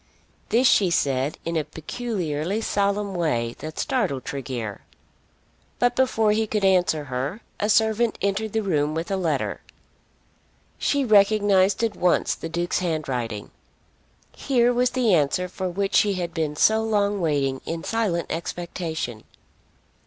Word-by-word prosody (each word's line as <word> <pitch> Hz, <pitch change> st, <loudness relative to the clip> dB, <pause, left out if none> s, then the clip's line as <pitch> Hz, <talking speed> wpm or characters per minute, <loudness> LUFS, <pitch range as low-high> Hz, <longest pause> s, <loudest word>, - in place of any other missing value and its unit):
This 245 Hz, +3 st, +4 dB
she 195 Hz, -6 st, +4 dB
said 140 Hz, -3 st, 0 dB
in 165 Hz, 0 st, -2 dB
a 155 Hz, -, +1 dB
peculiarly 175 Hz, 0 st, -3 dB
solemn 200 Hz, -2 st, 0 dB
way 120 Hz, -10 st, -1 dB
that 155 Hz, 0 st, -7 dB
startled 185 Hz, -, -1 dB
Tregear. 125 Hz, -7 st, -5 dB, 1.0 s
But 245 Hz, 0 st, +2 dB
before 225 Hz, -5 st, +2 dB
he 220 Hz, +1 st, +1 dB
could 210 Hz, -2 st, 0 dB
answer 180 Hz, -5 st, +3 dB
her 135 Hz, -, -4 dB, 0.2 s
a 210 Hz, -, 0 dB
servant 220 Hz, +1 st, +2 dB
entered 200 Hz, +2 st, -1 dB
the 220 Hz, -1 st, 0 dB
room 155 Hz, -5 st, 0 dB
with 165 Hz, +4 st, -3 dB
a -, -, +1 dB
letter. 165 Hz, -7 st, -1 dB, 1.2 s
She 280 Hz, -2 st, +1 dB
recognised 205 Hz, -1 st, +4 dB
at 225 Hz, -2 st, 0 dB
once 180 Hz, 0 st, +2 dB
the 165 Hz, -, -6 dB
Duke's 175 Hz, +1 st, -1 dB
handwriting. 130 Hz, -, -3 dB, 0.8 s
Here 245 Hz, -2 st, +2 dB
was 250 Hz, +1 st, +2 dB
the 250 Hz, -6 st, +2 dB
answer 165 Hz, +3 st, +2 dB
for 185 Hz, +1 st, -4 dB
which 195 Hz, +2 st, -2 dB
she 205 Hz, -1 st, +3 dB
had 175 Hz, -2 st, -3 dB
been 155 Hz, -2 st, -2 dB
so 220 Hz, +8 st, +4 dB
long 205 Hz, -2 st, 0 dB
waiting 140 Hz, -5 st, 0 dB
in 165 Hz, 0 st, -4 dB
silent 210 Hz, -7 st, 0 dB
expectation! 165 Hz, -8 st, -4 dB
180 Hz, 140 wpm, -24 LUFS, 155-215 Hz, 1.2 s, This